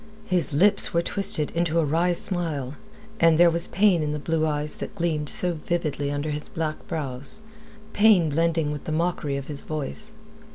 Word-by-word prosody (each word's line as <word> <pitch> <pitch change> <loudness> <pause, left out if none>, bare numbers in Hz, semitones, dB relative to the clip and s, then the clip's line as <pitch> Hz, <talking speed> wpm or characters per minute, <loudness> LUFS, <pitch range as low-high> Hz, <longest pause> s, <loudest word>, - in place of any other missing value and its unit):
His 180 -8 +1
lips 195 +5 +4
were 170 - +2
twisted 190 -7 +2
into 170 -1 -1
a 165 - +3
wry 165 +5 +1
smile, 160 -7 -3 0.5
and 165 -1 +4
there 170 0 +6
was 170 +1 +3
pain 190 -3 +2
in 150 -1 -2
the - - -2
blue 160 +1 -1
eyes 150 0 -2
that - - -7
gleamed 155 -4 -1
so 180 -1 0
vividly 155 -3 -3
under 145 +1 -3
his 150 0 -5
black 155 -2 -4
brows, 140 +4 -5 0.5
pain 205 -7 +4
blending 165 0 0
with 150 -1 -7
the - - -4
mockery 155 -3 -1
of 140 - -6
his 145 -1 -4
voice. 155 +9 -1
160 Hz, 180 wpm, -24 LUFS, 150-175 Hz, 0.5 s, there